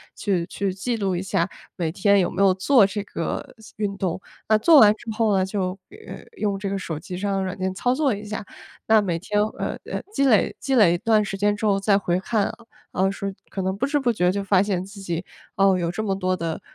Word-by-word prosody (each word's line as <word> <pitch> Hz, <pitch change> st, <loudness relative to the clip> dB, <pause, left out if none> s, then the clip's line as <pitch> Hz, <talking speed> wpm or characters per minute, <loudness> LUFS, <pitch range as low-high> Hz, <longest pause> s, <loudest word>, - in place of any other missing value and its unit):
去 185 Hz, -5 st, -1 dB
去 195 Hz, 0 st, -2 dB
记 230 Hz, +5 st, -2 dB
录 195 Hz, -4 st, -1 dB
一 175 Hz, -, -2 dB
下 180 Hz, -2 st, 0 dB, 0.3 s
每 170 Hz, -3 st, -1 dB
天 200 Hz, +2 st, +3 dB
有 180 Hz, -, +1 dB
没 -, -, -2 dB
有 195 Hz, -1 st, +5 dB
做 205 Hz, +4 st, +4 dB
这 200 Hz, +2 st, -3 dB
个 165 Hz, -4 st, -5 dB, 0.2 s
运 205 Hz, -2 st, -2 dB
动。 185 Hz, -2 st, -2 dB, 0.3 s
那 215 Hz, -, +6 dB
做 300 Hz, +7 st, +7 dB
完 210 Hz, -1 st, +7 dB
之 225 Hz, -, -11 dB
后 220 Hz, -4 st, +3 dB
呢， 185 Hz, -, +2 dB
就， 190 Hz, -1 st, -2 dB, 0.2 s
呃， 425 Hz, +2 st, -11 dB, 0.2 s
用 200 Hz, -2 st, -1 dB
这 200 Hz, 0 st, -3 dB
个 200 Hz, -, -2 dB
手 165 Hz, -5 st, -5 dB
机 180 Hz, +1 st, -7 dB
上 200 Hz, +2 st, -2 dB
的 195 Hz, -, 0 dB
软 185 Hz, 0 st, -4 dB
件 185 Hz, 0 st, -2 dB
操 245 Hz, +6 st, 0 dB
作 275 Hz, -2 st, +1 dB
一 205 Hz, +1 st, -6 dB
下， 210 Hz, 0 st, -5 dB, 0.4 s
那 220 Hz, -1 st, +5 dB
每 180 Hz, -5 st, -1 dB
天， 205 Hz, +4 st, -1 dB, 0.2 s
呃， -, -, -3 dB, 0.4 s
积 275 Hz, -, +2 dB
累 225 Hz, -7 st, +3 dB
积 270 Hz, 0 st, -1 dB
累 205 Hz, -8 st, +6 dB
一 -, -, 0 dB
段 220 Hz, +2 st, +2 dB
时 195 Hz, -1 st, -4 dB
间 205 Hz, +1 st, +2 dB
之 205 Hz, -, -4 dB
后 200 Hz, -2 st, +3 dB
再 195 Hz, 0 st, +3 dB
回 180 Hz, -2 st, 0 dB
看， 210 Hz, +2 st, 0 dB, 0.4 s
啊， 190 Hz, +1 st, +1 dB
说 195 Hz, 0 st, -4 dB, 0.2 s
可 195 Hz, -, -4 dB
能 190 Hz, 0 st, -1 dB
不 245 Hz, -, 0 dB
知 290 Hz, +1 st, +1 dB
不 250 Hz, -3 st, +1 dB
觉 180 Hz, -5 st, +2 dB
就 200 Hz, +1 st, -2 dB
发 195 Hz, -1 st, +3 dB
现 190 Hz, -3 st, -1 dB
自 200 Hz, +1 st, -11 dB
己， 175 Hz, -2 st, -3 dB, 0.3 s
哦， 195 Hz, -2 st, +4 dB
有 170 Hz, -1 st, -1 dB
这 195 Hz, -, -3 dB
么 195 Hz, -3 st, 0 dB
多 185 Hz, -1 st, 0 dB
的 165 Hz, -3 st, -4 dB
195 Hz, 260 characters per minute, -23 LUFS, 185-215 Hz, 0.4 s, 做